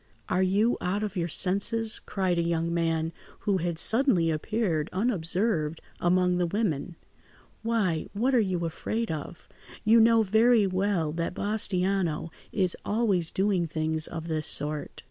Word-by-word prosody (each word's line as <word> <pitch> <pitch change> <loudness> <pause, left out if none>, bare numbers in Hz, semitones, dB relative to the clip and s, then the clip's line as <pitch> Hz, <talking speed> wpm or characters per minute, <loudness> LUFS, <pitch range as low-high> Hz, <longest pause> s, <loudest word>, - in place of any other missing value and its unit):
"Are 180 - +1
you 200 +5 +2
out 195 +4 -1
of 210 -2 -4
your 170 -2 -1
senses?" 200 +6 +2
cried 185 -3 -1
a - - +3
young 170 0 -1
man 165 -1 -1 0.3
who 200 -2 +1
had 170 -2 -3
suddenly 205 - +4
appeared, 165 -1 -1
unobserved 180 -5 -1 0.2
among 180 0 +2
the 175 - +1
women. 175 -4 -2 0.7
"Why, 215 -8 -1
what 245 +6 0
are 250 - +5
you 185 -5 -1
afraid 220 +7 -3
of? 160 +2 -7 0.4
You 225 +2 +6
know 225 0 +5
very 220 +2 +4
well 185 -4 0
that 170 +2 -3
Bastiano 190 -5 -1 0.2
is 185 -4 +2
always 205 -7 +1
doing 190 -3 0
things 155 0 -1
of 165 0 -7
this 155 -2 -1
sort. 150 0 +2
185 Hz, 145 wpm, -27 LUFS, 165-210 Hz, 0.7 s, You